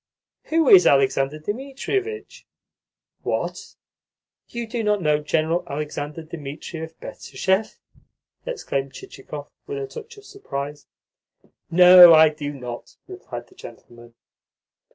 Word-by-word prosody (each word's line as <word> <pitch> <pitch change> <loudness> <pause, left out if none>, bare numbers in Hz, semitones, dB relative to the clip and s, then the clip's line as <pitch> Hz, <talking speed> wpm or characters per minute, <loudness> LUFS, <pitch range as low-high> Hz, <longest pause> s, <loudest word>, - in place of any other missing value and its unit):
"Who 320 -2 +1
is 185 -6 +8
Alexander 135 +1 +2
Dmitrievitch?" 275 - -5 0.7
"What? - - -4 0.7
You 235 0 -5
do 225 0 -4
not 210 -1 +1
know 150 -4 +1
General 160 +3 0
Alexander 150 +2 -5
Dmitrievitch 160 +1 -8
Betrishev?" 190 +3 -2 0.7
exclaimed 140 - -4
Chichikov 145 +2 -10 0.2
with 425 0 -5
a 425 - -3
touch 460 +1 -11
of 410 - -15
surprise. 145 - -7 0.8
"No, 180 0 +9
I 155 0 +7
do 150 -1 -6
not," 125 -4 -9
replied - - -8
the - - -20
gentleman. 120 0 -14
160 Hz, 110 wpm, -22 LUFS, 145-235 Hz, 0.8 s, No